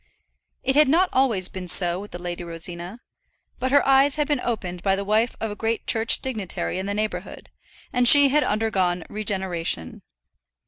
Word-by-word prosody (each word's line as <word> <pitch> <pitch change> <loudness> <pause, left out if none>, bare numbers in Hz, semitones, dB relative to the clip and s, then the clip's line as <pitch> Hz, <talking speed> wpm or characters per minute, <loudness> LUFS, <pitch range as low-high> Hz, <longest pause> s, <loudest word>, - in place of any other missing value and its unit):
It 265 +1 0
had 300 -2 +5
not 355 +5 +3
always 230 -9 +2
been 185 -1 -8
so 175 0 +2
with 205 +1 -9
the - - -7
Lady 175 0 -6
Rosina; 175 +5 -6 0.6
but 260 - -2
her 285 0 +4
eyes 275 +1 +4
had 295 -2 -1
been 295 -3 0
opened 185 -8 -4
by 195 +1 +1
the 200 - -3
wife 220 +3 +1
of 220 -1 -3
a - - -6
great 225 +2 -2
church 225 0 +2
dignitary 215 -7 -3
in 190 - -4
the 200 - -2
neighbourhood, 215 0 -5 0.4
and 245 -1 +3
she 285 +1 +7
had 295 +2 +2
undergone 190 -5 0
regeneration. 190 - -2
210 Hz, 180 wpm, -23 LUFS, 180-255 Hz, 0.6 s, she